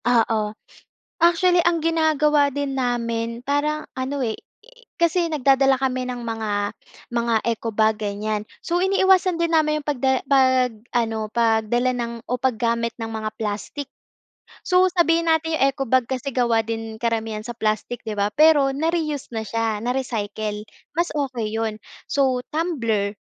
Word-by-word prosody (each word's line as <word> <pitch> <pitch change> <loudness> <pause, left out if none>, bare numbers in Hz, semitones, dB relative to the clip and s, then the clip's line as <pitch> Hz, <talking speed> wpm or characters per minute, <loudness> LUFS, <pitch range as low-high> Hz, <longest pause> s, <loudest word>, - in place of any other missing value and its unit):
Oo, 225 -3 +1 0.7
actually 345 0 +4
ang 345 -1 +2
ginagawa 305 -3 +2
din 280 0 -2
namin 235 -2 -1
parang 290 +3 -1
ano 265 +2 -3
eh, 225 -4 -1 0.6
kasi 340 +1 +3
nagdadala 270 -2 +3
kami 255 -1 0
ng 250 -1 -5
mga 215 -3 -2 0.3
mga 235 -1 0
eco 230 0 -2
bag, 220 0 +2
ganiyan. 210 0 -3 0.2
So, 345 - -2
iniiwasan 380 -2 +3
din 335 -1 +2
namin 305 -1 +2
yung 295 - -13
pagda 265 -2 +1
pag-ano, 240 -4 +1
pagdala 235 +2 +1
ng 235 -1 -3 0.2
o 250 - 0
paggamit 235 -2 0
ng 225 - -3
mga 220 -1 -4
plastic. 220 +7 -4 0.8
So, 365 0 +5
sabihin 335 -1 +3
natin 320 0 +1
yung 275 - +3
eco 270 -1 -4
bag 260 +2 +3
kasi 260 +1 -3
gawa 235 -3 +3
din 225 -1 -5
karamihan 225 -2 -2
sa 240 -1 -6
plastic, 220 +2 -2
'di 215 -2 -4
ba? 200 - +3
Pero 290 -3 +5
na-reuse 310 -3 -1
na 220 -1 -4
siya, 225 -1 -1
na-recycle, 215 -3 -3 0.3
mas 345 +1 +2
okey 250 -7 -2
yun. 220 -1 -2 0.3
So, 260 -3 +2
tumbler 230 - -1
250 Hz, 145 wpm, -22 LUFS, 225-295 Hz, 0.8 s, So